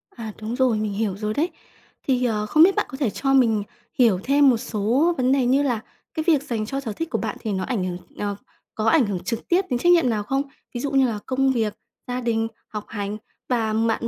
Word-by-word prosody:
À, 225 -3 -6
đúng 220 +3 -3
rồi, 255 -4 +2
mình 215 -1 -2
hiểu 200 -2 -1
rồi 210 0 -2
đấy. 325 +8 0 0.5
Thì, 255 -2 +1
ờ, 215 -3 0
không 310 +9 +5
biết 385 +2 +5
bạn - - +1
có 265 - -7
thể 265 -6 +1
cho 270 +5 0
mình 225 -6 +4 0.4
hiểu 220 -7 +5
thêm 280 0 +5
một 240 - +3
số 240 +8 +1
vấn 255 0 +2
đề 270 -2 +3
như 270 +3 +3
là 245 -6 0 0.3
cái 315 - -2
việc 295 -4 +4
dành 225 -6 -2
cho 270 +5 -3
sở 225 -6 -4
thích 330 +6 -4
của - - -1
bạn - - -3
thì 220 - -3
nó 190 - -1
ảnh 225 -8 -1
hưởng 180 -1 -3 0.2
ờ, 205 -1 -2 0.4
có 215 - -2
ảnh 310 -8 +4
hưởng 195 -3 -2
trực 230 -1 -4
tiếp 355 +2 +3
đến 245 - +1
trách 350 - +4
nhiệm 335 -8 +5
nào 210 -2 0
không? 270 +6 0 0.3
Ví 240 - -4
dụ 285 - -2
như 270 -2 +4
là 215 -3 -3
công 265 0 +2
việc, 220 -4 0 0.3
gia 250 0 -2
đình, 225 -1 0 0.2
học 210 -1 -6
hành 205 -1 -4 0.3
và 225 -3 +1
bạn 225 +1 +1
240 Hz, 250 wpm, -23 LUFS, 215-270 Hz, 0.5 s, không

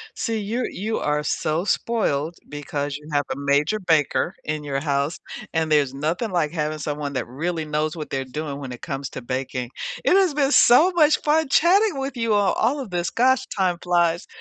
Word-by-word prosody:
See, 225 -1 -2
you're 225 +5 -2
you 220 +3 -3
are 150 0 0
so 155 +3 -1
spoiled 175 -9 0
because 145 -1 -4
you 150 +1 -15
have 145 -1 +2
a - - -5
major 140 +8 +1
baker 165 0 +1
in 155 0 -3
your 140 -2 -2
house, 140 +1 -1 0.4
and 160 -1 0
there's 140 -3 +3
nothing 160 - -2
like 170 -5 0
having 155 -2 -2
someone 145 -1 -3
that 125 - -2
really 160 +6 -3
knows 155 +1 -2
what 155 -2 -6
they're 135 -1 -2
doing 145 +1 -5
when 135 -3 -7
it 125 - -10
comes 135 -3 -4
to - - -7
baking, 125 0 -4 0.3
it - - +3
has 375 -5 +4
been 280 -1 +2
so 295 +10 +6
much 310 -3 +4
fun 310 0 +2
chatting 370 +4 +4
with 270 +1 -3
you 230 -2 +1
on 205 -1 +3
all 280 +5 +2
of 250 -7 -7
this, 175 -1 -1
gosh, 260 +2 +2
time 185 -3 +1
flies. 175 -1 +1
160 Hz, 200 wpm, -23 LUFS, 145-225 Hz, 0.4 s, so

